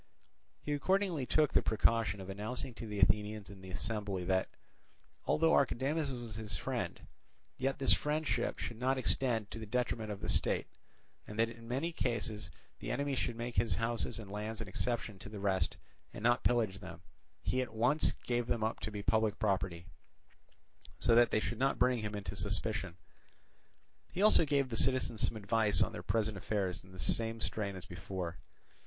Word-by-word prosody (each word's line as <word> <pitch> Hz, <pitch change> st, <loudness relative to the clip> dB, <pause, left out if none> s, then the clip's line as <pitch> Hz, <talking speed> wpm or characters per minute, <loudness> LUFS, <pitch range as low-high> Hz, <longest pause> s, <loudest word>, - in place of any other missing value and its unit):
He 150 Hz, -, -1 dB
accordingly 175 Hz, -2 st, +1 dB
took 155 Hz, -2 st, +3 dB
the -, -, +5 dB
precaution 110 Hz, -2 st, +2 dB
of 95 Hz, -, -8 dB
announcing 110 Hz, +6 st, -4 dB
to 115 Hz, -, -7 dB
the 105 Hz, -1 st, -5 dB
Athenians 105 Hz, +1 st, +2 dB
in 100 Hz, -1 st, -12 dB
the 95 Hz, -, -10 dB
assembly 100 Hz, -1 st, -2 dB
that, 95 Hz, +1 st, +1 dB, 0.8 s
although 165 Hz, +1 st, +4 dB
Archidamus 140 Hz, +3 st, +2 dB
was 120 Hz, -4 st, -5 dB
his 110 Hz, -1 st, -2 dB
friend, -, -, -3 dB, 0.6 s
yet 135 Hz, +1 st, 0 dB
this 135 Hz, -, +5 dB
friendship 150 Hz, +1 st, 0 dB
should 115 Hz, -, -5 dB
not 130 Hz, +2 st, +2 dB
extend 120 Hz, -4 st, 0 dB
to 115 Hz, -, -5 dB
the 110 Hz, -, -7 dB
detriment 115 Hz, -1 st, -1 dB
of 100 Hz, -1 st, -4 dB
the -, -, -3 dB
state, -, -, +1 dB, 0.6 s
and 105 Hz, -, -8 dB
that 115 Hz, 0 st, +3 dB
in 120 Hz, +8 st, -3 dB
case 110 Hz, -, -2 dB, 0.3 s
the -, -, -5 dB
enemy 140 Hz, 0 st, 0 dB
should 120 Hz, -2 st, -1 dB
make 120 Hz, +1 st, -5 dB
his 110 Hz, -7 st, +3 dB
houses 115 Hz, 0 st, -1 dB
and 105 Hz, -4 st, -8 dB
lands 105 Hz, +2 st, -4 dB
an 110 Hz, -, -4 dB
exception 110 Hz, -2 st, -2 dB
to 100 Hz, -, -9 dB
the 105 Hz, -1 st, -7 dB
rest 95 Hz, -1 st, +1 dB, 0.4 s
and 105 Hz, -, -7 dB
not 120 Hz, +2 st, +3 dB
pillage 110 Hz, -6 st, +2 dB
them, 85 Hz, +1 st, -9 dB, 0.4 s
he 130 Hz, -, +1 dB
at 125 Hz, -, -4 dB
once 125 Hz, +7 st, +3 dB
gave 120 Hz, -1 st, 0 dB
them 115 Hz, -2 st, 0 dB
up 110 Hz, -, -1 dB
to -, -, -3 dB
be 105 Hz, -1 st, -5 dB
public 110 Hz, +2 st, +2 dB
property, 95 Hz, -5 st, 0 dB, 1.1 s
so -, -, +3 dB
that 120 Hz, +1 st, +6 dB
they -, -, +2 dB
should 115 Hz, +1 st, -3 dB
not 135 Hz, +1 st, +2 dB
bring 125 Hz, -1 st, +3 dB
him 105 Hz, -1 st, -3 dB
into 100 Hz, -2 st, -5 dB
suspicion. 100 Hz, -2 st, -1 dB, 1.1 s
He 190 Hz, -, 0 dB
also 215 Hz, -6 st, +6 dB
gave 140 Hz, -3 st, +2 dB
the 115 Hz, -, -3 dB
citizens 130 Hz, -4 st, +2 dB
some 115 Hz, -, -4 dB
advice 105 Hz, 0 st, +2 dB
on -, -, -2 dB
their -, -, -6 dB
present 110 Hz, -2 st, 0 dB
affairs 95 Hz, -2 st, -1 dB
in 95 Hz, -, -16 dB
the 95 Hz, -, -11 dB
same 115 Hz, +4 st, +1 dB
strain 105 Hz, -2 st, -1 dB
as 95 Hz, -, -8 dB
before. 90 Hz, -1 st, -5 dB
110 Hz, 185 wpm, -34 LUFS, 100-125 Hz, 1.1 s, that